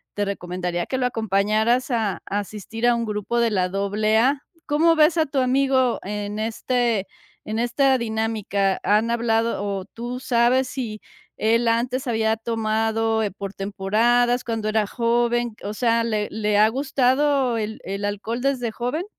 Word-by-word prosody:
te 205 Hz, -, 0 dB
recomendaría 180 Hz, -2 st, -3 dB
que 260 Hz, -, -3 dB
lo 255 Hz, -, 0 dB
acompañaras 220 Hz, +3 st, +1 dB
a 220 Hz, -5 st, -1 dB
asistir 210 Hz, +3 st, -3 dB
a 240 Hz, -, +4 dB
un 235 Hz, 0 st, -2 dB
grupo 210 Hz, +3 st, -2 dB
de 230 Hz, -1 st, +2 dB
la 185 Hz, -2 st, +1 dB
AA, 215 Hz, +7 st, +1 dB, 0.2 s
¿cómo 325 Hz, +3 st, +3 dB
ves 315 Hz, +2 st, +4 dB
a 320 Hz, -, +3 dB
tu 275 Hz, -1 st, -2 dB
amigo 260 Hz, -1 st, +2 dB
en, 205 Hz, +1 st, -4 dB
este 230 Hz, -1 st, 0 dB, 0.4 s
en 220 Hz, +1 st, -2 dB
esta 260 Hz, +3 st, +2 dB
dinámica?, 220 Hz, -4 st, -1 dB
¿han 215 Hz, +3 st, +2 dB
hablado, 230 Hz, -2 st, 0 dB
o 200 Hz, -2 st, -3 dB
tú 240 Hz, +4 st, -6 dB
sabes 250 Hz, +1 st, +2 dB
si 230 Hz, -5 st, -5 dB, 0.4 s
él 230 Hz, +2 st, +2 dB
antes 245 Hz, +3 st, 0 dB
había 220 Hz, -1 st, +1 dB
tomado, 225 Hz, 0 st, 0 dB
eh, 210 Hz, -, 0 dB
por 200 Hz, 0 st, -7 dB
temporadas, 230 Hz, +6 st, +1 dB
cuando 225 Hz, -2 st, -3 dB
era 215 Hz, -1 st, +1 dB
joven? 240 Hz, 0 st, 0 dB
O 205 Hz, +1 st, -4 dB
sea, 230 Hz, 0 st, +2 dB
¿le 215 Hz, -2 st, -1 dB
le 210 Hz, -1 st, 0 dB
ha 215 Hz, +1 st, +6 dB
gustado 265 Hz, 0 st, +1 dB
el 215 Hz, +1 st, -4 dB
el 195 Hz, +2 st, -5 dB
alcohol 205 Hz, +4 st, -3 dB
desde 255 Hz, -4 st, 0 dB
joven? 250 Hz, -, -3 dB
225 Hz, 155 wpm, -23 LUFS, 210-245 Hz, 0.4 s, ha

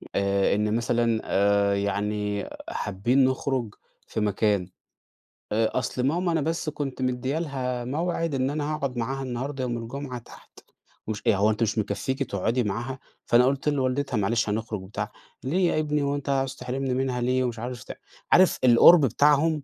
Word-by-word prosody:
آآ 100 Hz, 0 st, +2 dB
إن 105 Hz, +1 st, 0 dB
مثلًا 115 Hz, -1 st, +1 dB
آآ 100 Hz, 0 st, +2 dB
يعني 105 Hz, 0 st, -2 dB, 0.2 s
حابين 120 Hz, +7 st, +1 dB
نخرج 130 Hz, -4 st, -1 dB, 0.3 s
في -, -, -3 dB
مكان، 105 Hz, -2 st, +1 dB, 0.8 s
آآ 110 Hz, +2 st, +1 dB
أصل 125 Hz, 0 st, -3 dB
ماما 170 Hz, +6 st, +1 dB
أنا 165 Hz, -2 st, +1 dB
بس 165 Hz, +1 st, -1 dB
كنت 140 Hz, -3 st, -5 dB
مديَّة 130 Hz, +3 st, -1 dB
لها 130 Hz, -6 st, -3 dB
موعد 165 Hz, +3 st, -1 dB
إن 130 Hz, 0 st, 0 dB
أنا 150 Hz, +1 st, -2 dB
هاقعد 140 Hz, -4 st, -3 dB
معاها 135 Hz, +3 st, -2 dB
النهاردة 130 Hz, +2 st, -4 dB
يوم 120 Hz, -2 st, -2 dB
الجمعة 125 Hz, +2 st, -6 dB
تحت 115 Hz, -, -16 dB, 0.5 s
ومش 105 Hz, -1 st, -4 dB
آآ -, -, +5 dB
هو 100 Hz, +2 st, +3 dB
أنتِ 110 Hz, +2 st, 0 dB
مش 110 Hz, 0 st, -1 dB
مكفيكِ 130 Hz, +5 st, -1 dB
تقعدي 115 Hz, +1 st, -1 dB
معاها؟ 120 Hz, +6 st, -3 dB, 0.3 s
فأنا 120 Hz, +1 st, +5 dB
قُلت 140 Hz, +2 st, +1 dB
لوالدتها 135 Hz, -2 st, 0 dB
معلش 105 Hz, +2 st, +1 dB
هنخرج 110 Hz, -1 st, -3 dB
وبتاع، 95 Hz, +3 st, -5 dB, 0.3 s
ليه 175 Hz, +7 st, +1 dB
يا -, -, +1 dB
ابني 150 Hz, -1 st, 0 dB
هو 140 Hz, 0 st, 0 dB
أنتَ 145 Hz, 0 st, -5 dB
عاوز 135 Hz, -1 st, 0 dB
تحرمني 130 Hz, +1 st, -3 dB
منها 130 Hz, -1 st, -1 dB
ليه؟ 130 Hz, +1 st, +1 dB
ومش 120 Hz, -3 st, -3 dB
عارف 125 Hz, 0 st, -5 dB
ت -, -, -8 dB, 0.4 s
عارف 185 Hz, 0 st, +5 dB
القرب 130 Hz, +6 st, +8 dB
بتاعهم 150 Hz, +4 st, +3 dB
125 Hz, 170 wpm, -26 LUFS, 110-140 Hz, 0.8 s, القرب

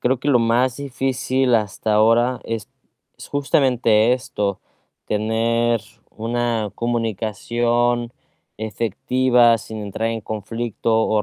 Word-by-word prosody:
Creo 125 Hz, +1 st, +1 dB
que 145 Hz, -, -3 dB
lo 125 Hz, -, +5 dB
más 115 Hz, +2 st, +2 dB
difícil 130 Hz, -2 st, 0 dB
hasta 105 Hz, 0 st, 0 dB
ahora 115 Hz, +4 st, +3 dB
es 115 Hz, -3 st, -4 dB, 0.5 s
es -, -, -11 dB
justamente 125 Hz, -5 st, +2 dB
esto, 105 Hz, -7 st, -3 dB, 0.5 s
tener 115 Hz, +2 st, +1 dB, 0.3 s
una 115 Hz, -2 st, -2 dB
comunicación 120 Hz, +1 st, 0 dB, 0.5 s
efectiva 115 Hz, +3 st, +2 dB
sin 110 Hz, +1 st, -8 dB
entrar 105 Hz, +2 st, -3 dB
en 115 Hz, -1 st, -3 dB
conflicto 110 Hz, +1 st, -1 dB
o 110 Hz, -1 st, +1 dB
115 Hz, 105 wpm, -21 LUFS, 110-125 Hz, 0.5 s, lo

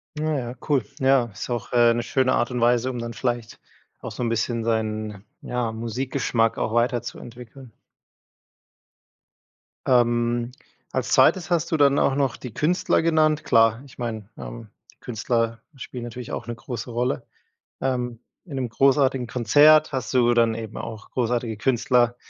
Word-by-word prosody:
Ah, 150 Hz, -, -4 dB, 0.2 s
ja, 120 Hz, -1 st, -4 dB
cool. 140 Hz, -5 st, +2 dB, 0.2 s
Ja, 135 Hz, -2 st, +4 dB
ist 105 Hz, -, -7 dB
auch, 120 Hz, -2 st, -4 dB
äh, 120 Hz, -1 st, +5 dB
'ne 120 Hz, -, -1 dB
schöne 130 Hz, +2 st, +1 dB
Art 120 Hz, -, +1 dB
und 125 Hz, -, -2 dB
Weise, 120 Hz, +1 st, +3 dB
um 125 Hz, -, -4 dB
dann 115 Hz, 0 st, -5 dB
vielleicht, 120 Hz, -2 st, -3 dB, 0.4 s
auch -, -, -7 dB
so 125 Hz, -, -4 dB
'n 115 Hz, -, 0 dB
bisschen 115 Hz, 0 st, -1 dB
seinen, 110 Hz, -2 st, -2 dB, 0.2 s
ja, 125 Hz, -2 st, -2 dB
Musikgeschmack 115 Hz, 0 st, -1 dB
auch 110 Hz, -, -2 dB
weiterzuentwickeln. 120 Hz, +1 st, -3 dB, 2.1 s
Ähm, 120 Hz, -1 st, +2 dB, 0.4 s
als -, -, -2 dB
2. 180 Hz, -2 st, +4 dB
hast 170 Hz, -2 st, +1 dB
du 160 Hz, -, +2 dB
dann 140 Hz, -1 st, +4 dB
auch 135 Hz, -, +2 dB
noch 135 Hz, -3 st, 0 dB
die 125 Hz, -4 st, -9 dB
Künstler 165 Hz, +4 st, +1 dB
genannt. 155 Hz, -2 st, +2 dB
Klar, 115 Hz, +1 st, +3 dB
ich 130 Hz, -, -17 dB
meine, 110 Hz, -4 st, -5 dB
ähm, -, -, -8 dB, 0.3 s
Künstler 115 Hz, 0 st, -2 dB
spielen 125 Hz, -2 st, -7 dB
natürlich 120 Hz, 0 st, -7 dB
auch -, -, -5 dB
'ne 120 Hz, -, -4 dB
große 125 Hz, +1 st, -6 dB
Rolle. 120 Hz, +2 st, -1 dB, 0.6 s
Ähm, 125 Hz, -3 st, -2 dB, 0.3 s
in 150 Hz, -7 st, -8 dB
'nem 130 Hz, -2 st, -2 dB
großartigen 135 Hz, 0 st, +2 dB
Konzert 145 Hz, +7 st, +5 dB
hast 130 Hz, -3 st, -3 dB
du 120 Hz, -2 st, +4 dB
dann 115 Hz, -1 st, +3 dB
eben 110 Hz, -2 st, -7 dB
auch 110 Hz, -1 st, -7 dB
großartige 120 Hz, -2 st, -1 dB
Künstler. 120 Hz, 0 st, +2 dB
120 Hz, 155 wpm, -24 LUFS, 115-130 Hz, 2.1 s, äh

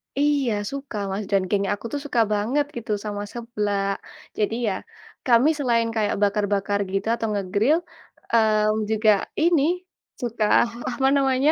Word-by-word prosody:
Iya. 280 Hz, -4 st, +2 dB, 0.2 s
suka, 275 Hz, -5 st, -6 dB
Mas, 200 Hz, +2 st, -2 dB
dan 195 Hz, -1 st, +4 dB
geng 200 Hz, -1 st, +1 dB
aku 205 Hz, -, -8 dB
tuh 290 Hz, -, -1 dB
suka 245 Hz, -5 st, +1 dB
banget 240 Hz, +8 st, +1 dB
gitu 235 Hz, -2 st, -5 dB
sama 205 Hz, -1 st, -3 dB
seblak. 210 Hz, -4 st, -2 dB, 0.4 s
Jadi 215 Hz, +1 st, 0 dB
ya, 200 Hz, -, +1 dB, 0.5 s
kami 245 Hz, +4 st, +5 dB
selain 235 Hz, -4 st, +2 dB
kayak 215 Hz, -2 st, +1 dB
bakar-bakar 205 Hz, 0 st, +1 dB
gitu 195 Hz, +2 st, -1 dB
atau 225 Hz, -, -3 dB
nge-grill, 205 Hz, -, +2 dB, 0.6 s
eee, 215 Hz, -1 st, +3 dB
juga 220 Hz, 0 st, +2 dB, 0.3 s
ini 335 Hz, -3 st, +4 dB, 0.6 s
suka, 230 Hz, -3 st, -1 dB, 0.5 s
apa 265 Hz, +2 st, +1 dB
namanya 270 Hz, +2 st, +3 dB
220 Hz, 140 wpm, -23 LUFS, 205-255 Hz, 0.6 s, kami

